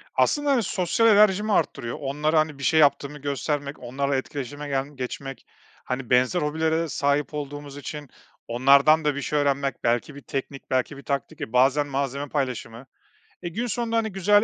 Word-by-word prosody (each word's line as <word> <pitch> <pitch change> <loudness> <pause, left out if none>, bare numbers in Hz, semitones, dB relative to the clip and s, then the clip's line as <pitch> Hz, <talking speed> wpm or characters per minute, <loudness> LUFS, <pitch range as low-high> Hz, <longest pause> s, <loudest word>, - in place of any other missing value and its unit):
Aslında, 290 -1 +2
hani, 245 -5 +3
sosyal 185 +6 +1
enerjimi 210 0 +4
arttırıyor. 115 -9 -1
Onlara, 150 +3 +1
hani, 155 -2 -1
bir - - -7
şey 160 - +3
yaptığımı 140 0 +3
göstermek, 145 0 -3
onlarla 140 +3 -2
etkileşime 145 +2 -5
gelm 140 +1 -2
geçmek 135 +1 -6 0.4
Hani, 125 -1 -4
benzer 130 +8 +3
hobilere 160 +2 0
sahip 145 +2 0
olduğumuz 145 -1 -6
için 145 -1 -7 0.4
onlardan 140 +6 +5
da 145 -2 +2
bir 140 - -3
şey 150 +2 0
öğrenmek, 140 -1 0
belki 120 +5 0
bir 140 - -10
teknik, 135 0 -6
belki 130 +2 0
bir 140 - -11
taktik 140 -3 -3
ve 110 - -5
bazen 135 +3 +3
malzeme 140 +1 -2
paylaşımı. 125 -3 -3 0.6
E, 175 - -4
gün 235 +8 -3
sonunda, 230 0 -1
hani, 220 -2 0
güzel 205 +3 +4
145 Hz, 170 wpm, -25 LUFS, 135-160 Hz, 0.6 s, onlardan